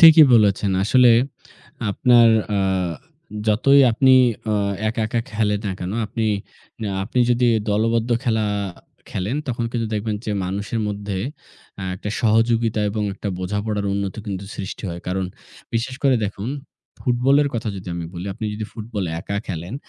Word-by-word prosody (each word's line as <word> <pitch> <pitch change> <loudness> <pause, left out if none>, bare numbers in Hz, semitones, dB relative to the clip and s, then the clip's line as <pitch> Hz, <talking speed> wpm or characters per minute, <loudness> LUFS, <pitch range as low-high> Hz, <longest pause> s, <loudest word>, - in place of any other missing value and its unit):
ঠিকই 160 -1 +10
বলেছেন। 100 -2 +3
আসলে 125 +2 +6 0.8
আপনার 120 +2 +5 0.2
অ্যা 100 -1 +1 0.9
যতই 135 +6 +5
আপনি 130 +3 +4 0.3
অ্যা 105 -1 +1 0.3
একা, 110 +1 -1
একা 115 +2 -1
খেলেন 105 -1 +1
না 95 - -1
কেন, 90 +1 -3 1.1
আপনি 125 +4 -3
যদি 120 0 +3 0.2
দলবদ্ধ 115 +3 +1
খেল, 115 -2 +2 0.7
খেলেন, 100 +9 -2
তখন 120 -1 -1
কিন্তু 115 -2 -1
দেখবেন 105 0 -1
যে 105 - 0
মানুষের 100 +4 -3
মধ্যে 100 -1 -4 0.6
অ্যা 100 - -4
একটা 105 - -5
সহযোগিতা 115 0 +2
এবং 105 +1 -2
একটা 100 - -5
বোঝাপড়ার 105 +2 -2
উন্নতি 100 +2 -3
কিন্তু 100 -1 -4
সৃষ্টি 95 +1 -6
হয়। 85 0 -5
কারণ 95 +1 -1 0.5
বিশেষ 120 +3 -1
করে 135 -2 +5
দেখুন, 100 +2 -4 0.5
ফুটবলের 135 +4 +3
কথা 115 -1 -2
যদি 95 -1 -8
আমি 85 -1 -4
বলি। 90 +2 -5
আপনি 115 - -6
যদি 110 - -4
ফুটবল 110 -3 -4 0.2
একা 100 - -4
খেলেন, 85 +3 -5
110 Hz, 145 wpm, -22 LUFS, 100-120 Hz, 1.1 s, ঠিকই